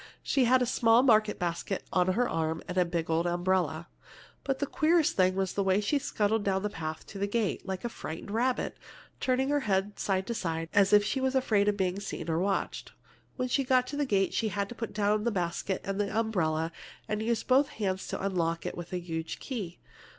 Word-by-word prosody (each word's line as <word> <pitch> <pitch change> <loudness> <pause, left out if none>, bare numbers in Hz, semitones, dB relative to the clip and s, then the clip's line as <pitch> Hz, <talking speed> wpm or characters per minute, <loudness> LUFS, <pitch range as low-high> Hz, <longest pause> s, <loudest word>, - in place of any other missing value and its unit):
She 265 -3 +2
had 255 +1 +4
a - - +1
small 235 0 +4
market 215 -4 +4
basket 175 +2 -2
on 180 -1 +3
her 245 +4 +2
arm, 160 0 -2
and 180 - -4
a 180 -1 +3
big 170 -1 -2
old 165 +2 +1
umbrella. 175 -2 0 0.6
"But 270 -1 -1
the 285 - -1
queerest 320 +1 +2
thing 185 0 +3
was 190 -1 -1
the 200 - 0
way 190 0 +3
she 245 +8 +1
scuttled 220 -6 0
down 190 -1 0
the 210 - -1
path 155 -3 -5
to 200 - -9
the 200 - 0
gate, 215 -1 -1
like 190 +3 -4
a - - +2
frightened 165 -2 -7
rabbit, 245 +4 0 0.4
turning 260 +1 +1
her 290 0 +2
head 200 -5 0
from - - -31
side 190 -1 0
to 235 - -2
side, 165 -6 -3
as 200 -1 +4
if 205 0 +7
she 265 +5 -1
was 265 0 0
afraid 215 -6 +2
of 205 -1 +2
being 190 0 0
seen 170 -5 -4
or 160 - +1
watched. 195 +2 -2 0.4
When 255 -1 -1
she 270 +2 +1
got 255 -1 +3
to - - -5
the 290 -1 0
gate, 195 -4 +1
she 225 - +1
had 200 -1 -2
to - - -6
put 230 -1 -5
down 210 0 +1
her 235 - +2
basket 185 -1 -2
and 195 +1 -2
umbrella 185 -7 0 0.4
and 215 0 -2
use 230 0 0
both 270 +2 +3
hands 190 -7 -3
to - - -3
unlock 170 -4 -1
it - - -3
with 175 -1 -7
a - - 0
huge 165 -2 -5
key. 205 -10 -5
200 Hz, 225 wpm, -29 LUFS, 180-235 Hz, 0.6 s, if